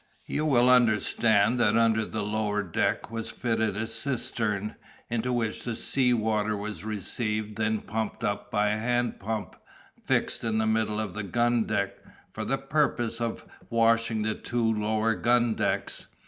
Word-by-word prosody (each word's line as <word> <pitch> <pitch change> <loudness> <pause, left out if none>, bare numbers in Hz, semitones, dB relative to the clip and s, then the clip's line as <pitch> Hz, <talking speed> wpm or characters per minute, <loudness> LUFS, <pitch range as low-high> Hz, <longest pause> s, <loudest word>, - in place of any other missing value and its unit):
You 155 +1 -1
will 125 -4 +4
understand 115 -2 +4
that 110 -1 +3
under 110 -1 +3
the 110 -1 -3
lower 105 0 -1
deck 95 +3 -1
was 115 -1 -3
fitted 110 -4 -1
a 110 - -1
cistern, 115 -3 -2 0.4
into 120 +1 0
which 115 -3 -1
the 120 -2 -3
sea 125 +2 +2
water 110 -2 +1
was 100 -4 -5
received 110 +1 -3
and 110 0 +1
then - - -15
pumped 110 +2 -4
up 105 -1 -2
by 105 0 +2
a 105 +1 0
hand 120 +1 0
pump, 110 +1 -4 0.5
fixed - - 0
in 110 -1 0
the 110 - +2
middle 110 -1 +1
of 105 -4 -3
the 105 - -4
gun 120 +3 +1
deck, 100 0 -1 0.4
for - - -4
the - - 0
purpose 115 0 0
of 115 -1 -3 0.2
washing 115 -1 +2
the 110 0 0
two 115 0 0
lower 110 +1 +1
gun 120 0 +2
decks. - - -2
110 Hz, 165 wpm, -27 LUFS, 105-115 Hz, 0.5 s, will